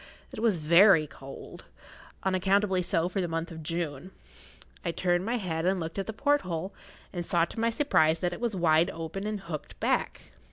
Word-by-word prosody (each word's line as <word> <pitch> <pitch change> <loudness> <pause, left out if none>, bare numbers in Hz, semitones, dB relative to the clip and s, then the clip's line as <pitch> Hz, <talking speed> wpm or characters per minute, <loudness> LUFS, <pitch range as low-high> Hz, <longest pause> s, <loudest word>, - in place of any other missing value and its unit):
It - - -7
was 220 -5 +2
very 170 +1 +6
cold—unaccountably 190 +7 -3
so 170 -1 0
for 190 +1 -2
the 175 - -1
month 165 +1 -3
of 160 -1 -8
June. 165 0 -4 0.7
I 175 - -1
turned 175 +1 0
my 240 +2 0
head 165 -6 -2
and 190 0 +2
looked 165 +3 -4
at 195 - -3
the - - -2
porthole, 200 - 0 0.4
and 175 -2 -3
saw 170 0 +2
to 225 - -8
my 230 +1 +2
surprise 165 - +3
that 175 +1 -1
it - - -8
was 235 -4 -1
wide 165 -2 +3
open 165 +5 -5
and 210 -2 -3
hooked 165 -5 -7
back. - - -1
175 Hz, 185 wpm, -28 LUFS, 165-195 Hz, 0.7 s, very